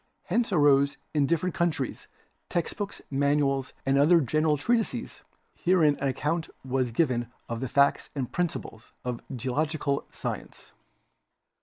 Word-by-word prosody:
Hence 220 +5 0
arose 140 -4 +4 0.2
in 145 -3 +3
different 170 +2 0
countries 170 -8 -1 0.4
text 170 - -1
books, 205 -1 -5
manuals 140 -1 +1
and 135 +1 +3
other 165 +4 +6
general 155 +2 +2
treatises 225 - -1 0.4
wherein 170 -5 +4
an 140 - 0
account 155 +5 -1 0.2
was 130 -1 0
given 120 -3 0 0.2
of 115 -1 -3
the 130 - -2
facts 140 0 +3
and 130 -4 -3
principles 165 -10 -3
of 125 -2 -3 0.2
geological 140 +3 -1
science. - - -6
145 Hz, 130 wpm, -27 LUFS, 135-170 Hz, 0.4 s, other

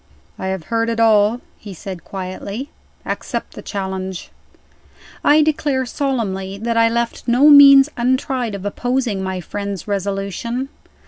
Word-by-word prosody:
"I 190 - -3
have 190 -3 -3
heard 230 0 +1
it 230 0 -2
all," 220 +1 +4 0.2
he 200 -3 -9
said, 185 0 -8
quietly. 195 +7 -6 0.3
"Accept - - -4
the - - -9
challenge." 190 -2 -5 0.9
I 300 +1 +5
declare 290 -3 0
solemnly 210 -8 -3
that 230 +3 -2
I 230 0 +4
left 235 +1 -2
no 260 +5 +5
means 275 -1 +9
untried 250 -2 0
of 200 0 -8
opposing 245 -1 -1
my 190 -1 -3
friend's 200 +1 -5
resolution. 200 +6 -3
225 Hz, 135 wpm, -19 LUFS, 195-255 Hz, 0.9 s, means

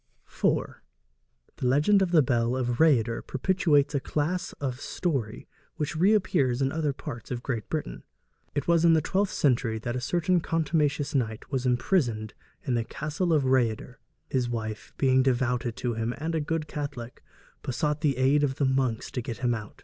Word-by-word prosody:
IV. - - -1 0.8
The 125 - -1
legend 150 +10 +4
of 190 - +2
the 165 -4 +5
Bell 120 -1 +1
of 125 -2 -1
Rhayader 120 -8 +3
perpetuates 150 -1 +1
a 140 - +1
class 165 +7 -2
of 130 -2 -4
story 125 - -3 0.3
which 150 +1 -3
reappears 170 - +2
in 135 -1 +1
other 155 -2 0
parts 135 -4 -8
of 120 -1 -4
Great 115 -6 -3
Britain. - - -4 0.5
It 145 - -2
was 170 -1 +4
in 170 -1 +6
the 160 - +4
twelfth 195 +6 0
century 120 -5 +1
that 120 +2 -4
a 125 - -2
certain 175 +6 +1
contumacious 155 -3 0
knight 110 -4 -2
was 130 -2 -1
imprisoned 120 - 0 0.3
in 130 - -1
the 120 -1 +1
castle 155 +8 -3
of 150 -3 +3
Rhayader. 125 -1 +1 0.3
His 125 -2 0
wife, 110 -2 -5
being 130 -1 +4
devoted 125 -2 0
to 120 -2 -2
him, 115 +2 -2
and 160 +3 -3
a 160 - 0
good 155 +1 -2
Catholic, 140 -6 -6 0.4
besought 150 +4 -1
the 140 -4 +1
aid 135 +3 +3
of 135 -2 0
the 140 - +1
monks 130 -4 0
to 125 - -3
get 115 -1 -5
him 125 -2 0
out. 110 -2 -7
135 Hz, 180 wpm, -27 LUFS, 120-155 Hz, 0.8 s, in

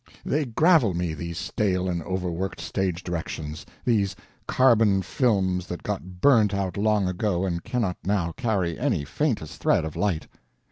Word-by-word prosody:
They 150 +1 +1
gravel 130 - +4
me, 85 -2 -1
these 85 +2 -5
stale 95 -1 0
and 85 -2 -1
overworked 90 +1 -3
stage 90 +2 -2
directions, 80 -3 -5 0.2
these 105 -5 +2 0.3
carbon 115 -6 +4
films 95 -5 +1
that 90 - -6
got 95 -3 -5
burnt 110 -8 +5
out 95 -2 -2
long 105 -1 +2
ago 95 -1 0
and 85 -2 -2
cannot 110 -8 -1
now 95 -4 0
carry 95 -5 -1
any 70 - 0
faintest 105 - -2
thread - - +3
of 80 - -6
light. 95 -7 0
95 Hz, 150 wpm, -25 LUFS, 85-105 Hz, 0.3 s, burnt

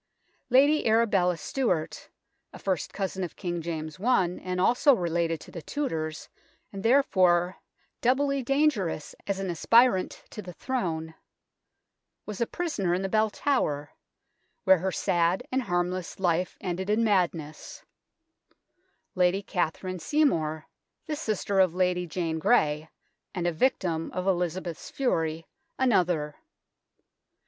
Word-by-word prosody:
Lady 285 +4 +4
Arabella 205 -6 +3
Stuart, 180 - -2 0.4
a - - -9
first 185 -5 -2
cousin 190 -1 -3
of 175 - -6
King 175 -3 -3
James 160 -1 -5
I 245 -6 +4 0.2
and 185 0 -3
also 250 - +4
related 170 -3 -1
to - - -12
the 170 - -7
Tudors, 155 - -3 0.5
and 195 - -5
therefore 185 -8 +3 0.4
doubly 275 +3 +2
dangerous 255 - 0
as 200 - -1
an 195 -2 -2
aspirant 230 +3 +3
to 210 - -7
the 180 -2 -9
Throne, 165 -11 -3 1.1
was 210 -1 -6
a 235 - +2
prisoner 205 - -1
in 185 - -2
the 195 - -2
Bell 215 +1 +2
Tower, 150 - -1 0.7
where 190 -1 +5
her 190 +2 -1
sad 175 +4 +1
and 260 +1 +1
harmless 180 -3 -2
life 180 -1 0
ended 185 +1 -3
in 215 +2 +2
madness; 170 -7 -1 1.3
Lady 180 +2 +2
Catherine 185 0 -2
Seymour, 160 - +1 0.4
the 305 - -3
sister 210 - -1
of 185 -3 +4
Lady 180 -1 +1
Jane 165 -1 -2
Grey, 150 0 +2 0.5
and 175 -2 -2
a 175 - +2
victim 165 -4 0
of 185 0 -3
Elizabeth's 180 -2 -2
fury, 165 - -1 0.3
another. 175 - +1
185 Hz, 125 wpm, -27 LUFS, 170-225 Hz, 1.3 s, where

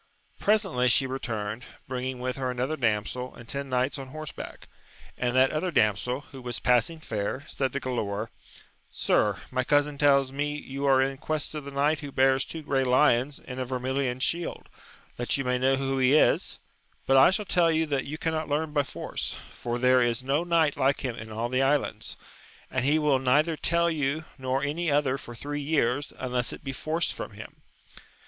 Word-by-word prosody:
Presently 195 - +2
she 135 +2 +4
returned, 115 -4 -4 0.2
bring 130 -1 -3
ing 130 0 -3
with 125 0 -2
her 130 -2 -2
another 125 +5 -1
damsel 120 0 -1
and 120 - -12
ten 140 +2 -3
knights 130 +3 0
on 135 - -7
horseback; 155 +3 -8 0.5
and 125 0 -1
that 130 +1 +5
other 155 +4 -1
damsel, 125 - +1
who 135 - -9
was 120 -2 -4
passing 125 +7 +2
fair, 115 +1 -3
said 135 -2 -1
to 140 - -1
Galaor, 110 -4 -3 0.6
Sir, - - +1
my 130 0 0
cousin 145 +1 +1
tells 140 -2 +4
me 145 +2 -2
you 140 -1 -5
are 130 -1 +5
in 135 0 -2
quest 155 -1 -2
of 150 -2 -5
the - - -6
knight 145 +2 +1
who 145 -1 -7
bears 135 0 +3
two 160 -1 -7
grey 135 -2 +1
lions 130 +1 +3
in 130 0 -8
a - - 0
vermilion 130 0 -2
shield, 170 +6 -2 0.5
that 120 +2 0
you 135 - -1
may 125 -1 0
know 135 +1 +3
who 135 0 -1
he 130 +2 +4
is; - - +3 0.5
but 135 - +3
I 135 +4 +8
tell 185 -3 +2
you 160 0 +2
that 140 -3 -1
you 150 +2 -5
cannot 160 -1 -2
learn 150 +2 0
by 145 - +3
force, 140 - -5 0.2
for 120 0 -4
there 125 +1 +4
is 120 0 +1
no 140 +5 +1
knight 165 -4 +2
like 135 0 +2
him 125 -3 -3
in 110 0 -9
all 115 +2 -2
the 130 +2 0
islands, 140 +1 0 0.5
and - - 0
he 145 +3 +4
will 150 -4 +3
neither 150 +6 +3
tell 170 +2 +1
you 155 +1 -1
nor 130 +1 -1
any 160 +4 -1
other 140 -2 +2
for 120 - -10
three 145 +5 -4
years, 140 -2 0
unless 125 -2 -1
it - - -9
be 135 - -4
forced 160 +4 -1
from - - -7
him. - - -11
135 Hz, 195 wpm, -27 LUFS, 125-150 Hz, 0.6 s, I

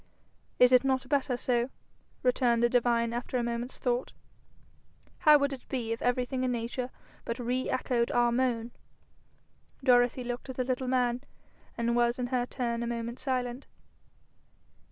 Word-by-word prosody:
'Is 250 0 +6
it 255 0 +6
not 265 -1 0
better 275 -3 +1
so?' 245 0 0 0.5
returned 245 -2 +2
the 240 - +5
divine 235 -1 +2
after 240 +1 -2
a 240 - 0
moment's 235 +1 -3
thought. 245 0 -1 1.1
'How 300 -1 +7
would 280 -1 0
it 260 - -10
be 235 -4 -2
if 230 - -3
everything 250 +1 0
in 255 - +1
nature 245 +1 -3 0.3
but 235 - -3
re 250 +1 -1
echoed 245 -2 0
our 240 0 +3
moan?' 240 -2 0 1.1
Dorothy 245 -1 +4
looked 245 +2 -5
at 260 - -6
the 255 - +1
little 255 0 -2
man, 250 -1 +1 0.6
and 235 0 0
was 240 0 +2
in 250 - -1
her 245 -1 +1
turn 235 -3 -2
a 235 - -2
moment 235 0 -4
silent. 255 -1 -2
245 Hz, 155 wpm, -29 LUFS, 235-255 Hz, 1.1 s, How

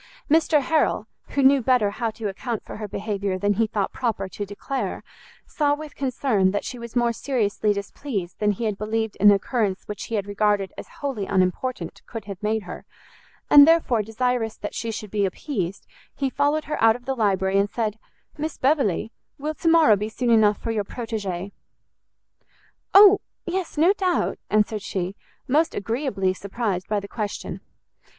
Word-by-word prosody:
Mr 315 -1 +4
Harrel, 315 +3 +1 0.2
who 280 - 0
knew 270 0 +6
better 235 -4 +3
how 230 +2 -2
to 220 0 -5
account 225 +3 -4
for - - -8
her 215 -1 -5
behaviour 200 -2 -2
than 205 +2 +1
he 225 +2 +1
thought 210 -2 -2
proper 220 -6 -2
to 205 +2 -6
declare, 205 +1 -4 0.4
saw 290 -2 +1
with 305 0 -9
concern 255 -7 +1
that 205 +1 -2
she 250 - -6
was 235 0 -9
more 240 -1 +2
seriously 220 -5 0
displeased 200 -1 -4
than 210 - +2
he 205 +3 -1
had 210 -2 -2
believed 220 +1 -2
an 205 - +8
occurrence 200 0 +1
which 210 - -5
he 230 - -3
had 200 -2 -1
regarded 205 -1 0
as - - -9
wholly 260 -9 -4
unimportant 190 +7 -1
could 225 -3 -7
have 200 -3 -8
made 215 0 0
her: 180 - -8 0.6
and, 290 0 +9
therefore, 320 -9 +4
desirous 225 +1 -1
that 205 - -6
she 230 - -3
should 215 -2 -6
be 205 -1 +1
appeased, 195 - -3 0.3
he 270 -2 -1
followed 290 +3 +1
her 300 - -4
out 225 0 +6
of 245 0 -11
the 270 - -1
library, 195 -3 +2
and 200 +1 +1
said, 220 -1 -2 0.4
"Miss 310 +1 -3
Beverley, 255 - +1 0.3
will 300 +2 -3
to 330 +2 0
morrow 325 -10 +6
be 210 +2 -3
soon 240 +2 -1
enough 215 -2 +5
for 230 - -4
your 215 -2 0
protegee?" 200 -5 -4 1.4
"O 405 0 +9 0.2
yes, 360 -2 -3
no 340 +6 +5
doubt!" 370 -3 0
answered 215 0 +1
she, 190 -1 -3 0.3
most 310 +5 +2
agreeably 210 -4 -1
surprised 195 -1 -3
by 210 -1 0
the 200 - -8
question. 210 -1 -5
220 Hz, 175 wpm, -24 LUFS, 200-265 Hz, 1.4 s, and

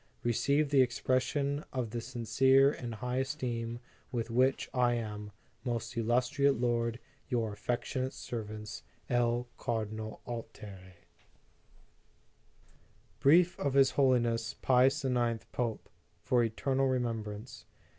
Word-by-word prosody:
" - - -37
Receive 140 +5 +2
the 140 -2 +6
expression 130 +3 0
of 125 -5 -3
the 120 0 -3
sincere 130 +3 +3
and 120 -5 -6
high 125 +3 -3
esteem 120 -4 -2 0.3
with 115 -1 -3
which 130 +3 +2
"I 125 -2 +3
am, 105 -2 -5 0.3
Most 115 -2 -3
illustrious 125 +5 +2
Lord, 115 -1 0 0.3
"Your 115 -5 0
affectionate 130 +4 -2
Servant, 105 -2 -6 0.3
"L. 120 0 +1
CARDINAL 110 -1 -3
ALTIERI." 105 -6 -8 2.2
BRIEF 165 +7 +5
OF 140 -1 -1
HIS 135 -1 +6
HOLINESS 120 -5 +2
PIUS 135 +3 +4
IX., 120 -3 0
POPE. 115 -3 -2 0.4
FOR 120 -2 +3
ETERNAL 130 +4 0
REMEMBRANCE. 115 -3 -3
120 Hz, 110 wpm, -32 LUFS, 115-130 Hz, 2.2 s, the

